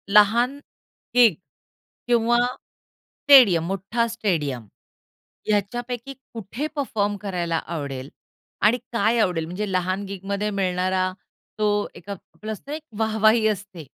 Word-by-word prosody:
लहान 225 +6 +4 0.6
गिग 235 -7 +6 0.7
किंवा 240 0 +3 0.9
स्टेडियम, 245 - +7
मोठा 195 +5 -1
स्टेडियम 160 - -2 0.8
याच्यापैकी 240 +5 -2 0.2
कुठे 230 +6 -4
परफॉर्म 210 -8 -1
करायला 180 -5 -2 0.2
आवडेल? 140 -3 -5 0.5
आणि 220 +4 +4 0.2
काय 230 +1 +2
आवडेल? 180 -6 +1
म्हणजे 190 +5 -4
लहान 185 +2 0
गिगमध्ये 200 +2 -3
मिळणारा 185 -1 0 0.5
तो 205 -1 +1
एक 185 - -13 0.4
असते 275 +7 -6
एक 315 - -7 0.2
वाह-वाही 220 0 +3
असते. 195 -6 -4
205 Hz, 105 wpm, -23 LUFS, 185-230 Hz, 0.9 s, स्टेडियम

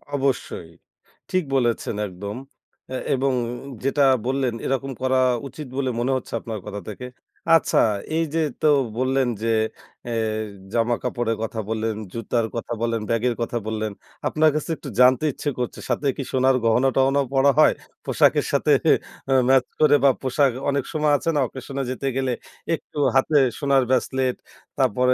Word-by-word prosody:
অবশ্যই, 135 -11 -2 0.6
ঠিক 185 -1 +2
বলেছেন 120 -4 0
একদম 100 +3 -7 0.6
আ - - -2 0.2
এবং 135 +1 +1 0.5
যেটা 140 +1 +2 0.2
বললেন 130 -2 0
এরকম 135 0 -1
করা 130 0 +2 0.3
উচিত 150 +1 -9
বলে 130 -2 0
মনে 125 +3 0
হচ্ছে 130 - -9
আপনার 110 -1 -6
কথা 105 -1 -6
থেকে। 105 +4 -7 0.5
আচ্ছা 165 - +3 0.4
এই 165 - +2
যে - - +2 0.2
তো - - +3 0.3
বললেন 130 +1 +1 0.2
যে 115 - +1 0.6
এ - - -3 0.6
জামা 120 0 +2
কাপড়ের 120 -2 -1
কথা 110 0 -4
বললেন, 110 0 -1 0.2
জুতার 115 0 -1
কথা 115 0 -3
বললেন, 115 -1 0
ব্যাগের 115 +1 +1
কথা 115 +1 -1
বললেন। 110 -1 -2 0.4
আপনার 155 0 +3
কাছে 155 - -2
একটু - - -8
জানতে 130 +3 +5
ইচ্ছে 145 - -3
করছে 125 - -3
সাথে 130 +4 0
কি 135 - -2
সোনার 130 0 +4
গহনা-টহনাও 135 +4 +3
পরা 135 +1 +5
হয় - - +6 0.3
পোশাকের - - +3
সাথে - - +2 0.6
আ - - +5 0.2
ম্যাচ 130 -1 +5
করে 150 -1 +6
বা 140 - +7
পোশাক, 135 +1 +2 0.2
অনেক 140 -1 0
সময় 150 -1 +2
আছে 165 - -2
না - - +3
অকেশনে 135 +2 -5
যেতে 135 +2 -3
গেলে 130 -1 0 0.4
একটু 150 - -14 0.2
হাতে 145 +3 +3 0.2
সোনার 140 -2 +3
ব্রেসলেট 130 0 +1 0.4
তারপরে 125 +4 +3
130 Hz, 155 wpm, -23 LUFS, 115-140 Hz, 0.6 s, বা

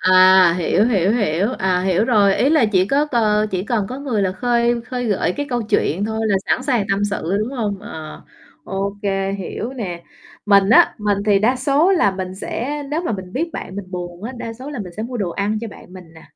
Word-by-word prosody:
À, 185 -1 +6
hiểu, 180 +3 +2
hiểu, 205 -5 +2
hiểu. 200 -4 +1
À, 185 -1 +1
hiểu 185 +2 +1
rồi, 205 -5 +3
ý 270 - +2
là 310 -7 +4
chỉ 185 -1 +3
có 280 +7 +2
c - - -20 0.4
chỉ 185 -1 -2
cần 220 -4 -1
có 255 - -6
người 255 -8 -1
là 185 -1 0
khơi 240 +2 +1
khơi 245 +1 -4
gợi 190 -4 0
cái 290 - -3
câu 245 -2 -1
chuyện 200 -3 0
thôi 220 +1 -3
là 200 -2 +2
sẵn - - +1
sàng 250 -6 +1
tâm 195 +1 +1
sự, 200 -2 -2
đúng 225 +5 -3
hông? 210 -6 -2
Ờ, 155 -1 -9 0.4
ô 195 +1 -3
kê, 195 -1 -1
hiểu 200 +5 -5
nè. 185 -9 -5 0.4
Mình 200 -1 +5
á, 230 - +6
mình 205 -1 0
thì 205 -2 +4
đa 235 +6 +2
số 295 +7 +2
là 205 - +3
mình 185 -1 -5
sẽ 275 +9 -4
nếu 305 +3 0
mà 335 - -2
mình 190 -3 -6
biết 330 +8 -2
bạn 185 - -7
mình 195 -2 -7
buồn 175 0 -7
á, 235 +4 -5
đa 230 -1 -6
số 255 +5 -9
là 285 - -6
mình 185 -5 -7
sẽ 215 - -3
mua 245 +2 -5
đồ 195 -6 -2
ăn 205 +4 -1
cho 230 - -5
bạn 185 - -14
mình 185 -1 -10
nè. 160 - -14
205 Hz, 240 wpm, -20 LUFS, 190-240 Hz, 0.4 s, À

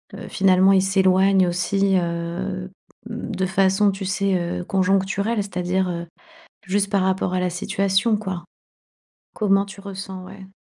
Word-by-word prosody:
heu, - - -8
finalement, 190 0 +4
il 190 - +5
s'éloigne 190 0 +3
aussi, 195 +2 +1
heu, 175 +2 -3
mmh - - -14 0.4
de 215 -4 -3
façon, 195 +2 +3
tu 195 0 -6
sais, 195 0 0 0.2
heu, - - -4
conjoncturelle? 195 +4 0
C'est-à-dire, 180 0 -1
heu, 170 -1 -4 0.6
juste 200 +1 0
par 200 -2 +2
rapport 185 -1 0
à 180 - +1
la 180 - 0
situation, 195 +5 +1
quoi. 190 -4 -5 0.9
Comment 195 -2 +2
tu 195 0 -11
ressens? 190 -1 -7
Ouais. 190 +1 -11
190 Hz, 145 wpm, -22 LUFS, 185-195 Hz, 0.9 s, il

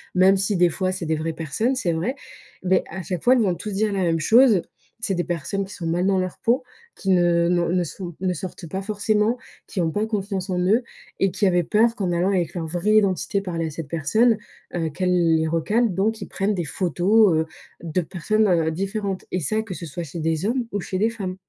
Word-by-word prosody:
même 190 +2 +5
si, 195 +2 0
des 175 -1 +4
fois, 185 +2 -1
c'est 185 -2 -4
des 160 0 +1
vraies 160 +1 -2
personnes, 190 - -1
c'est 190 -10 0
vrai. 180 +12 -1 0.5
Mais 185 0 +3
à 190 +3 -5
chaque 180 -1 -4
fois, 255 - +6
ils 245 - +3
vont 190 -5 +1
tous 210 +4 -6
dire 210 +2 +1
la 195 -1 0
même 165 -2 +1
chose: 220 - +5 0.4
c'est 195 -3 -1
des 175 - 0
personnes 175 +4 -2
qui 195 - -11
sont 170 - -6
mal 175 +2 0
dans 195 -1 +3
leur 185 -1 -3
peau, 250 +3 +1 0.3
qui 195 - -4
ne 175 -2 +4
n'ont, 175 -1 +2
ne 180 +1 +2
sont 175 +1 -7
ne 185 -1 +1
sortent 175 0 -7
pas 190 +4 -3
forcément, 210 +3 +1 0.3
qui 190 - -2
ont 165 -1 0
pas 210 +5 0
confiance 200 -3 -3
en 180 -1 0
eux 205 +7 +3 0.4
et 195 - +2
qui 200 +3 0
avaient 175 -1 +3
peur 225 +7 +3
qu'en 190 -6 -1
allant 175 +2 +1
avec 180 -5 0
leur 170 -2 -3
vraie 180 +6 +1
identité 200 -1 +2
parler 170 -4 -3
à - - -5
cette 155 0 -6
personne, 215 +10 +2 0.4
heu, 165 -2 -1
qu'elle 180 -1 +2
les 160 0 +1
recale. 205 +7 +1
Donc 215 +4 0
ils - - -5
prennent 200 +2 -1
des 175 - -1
photos, 185 +5 +3
heu, 160 - 0 0.4
de 165 +1 -1
personnes, 210 +6 0
heu, 165 -4 +2
différentes, 195 +2 -3
et 185 - -1
ça, 215 +9 0
que 220 -4 -7
ce 175 - -7
soit 165 +3 -5
chez 165 +1 -7
des 160 +2 -1
hommes 240 +3 0
ou 205 - -1
chez 185 - -3
des 220 +3 +3
femmes. 195 -5 -5
185 Hz, 235 wpm, -23 LUFS, 170-210 Hz, 0.5 s, fois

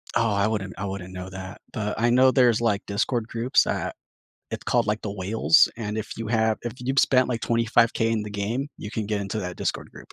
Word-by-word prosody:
Oh, 115 -1 +2
I 100 +1 +2
wouldn't 100 -4 -3
I 100 - -4
wouldn't 95 -1 -6
know 90 0 -6
that, 95 0 -8
but 105 0 -3
I 120 - +3
know 130 +2 +5
there's, 120 -4 +4
like, 105 -3 0
Discord 110 +3 -1
groups 120 +2 +2
that - - -2 0.6
it - - -5
called, 120 -3 +2
like, 105 +1 -1
The 105 - -3
Whales, 105 - +4
and 110 -2 -4
if 110 - -6
you 115 - -5
have 110 -1 +2
if 120 -1 -4
you've 135 +2 -1
spent, 130 -1 +4
like, 120 -2 -2
$25,000 115 0 +2
in 110 -2 0
the 105 - -7
game, 110 +7 -2
you 105 - -7
can 110 -2 -3
get 105 -1 -1
into 100 +2 -3
that 90 -2 -5
Discord - - -3
group. - - -14
110 Hz, 230 wpm, -25 LUFS, 100-120 Hz, 0.6 s, know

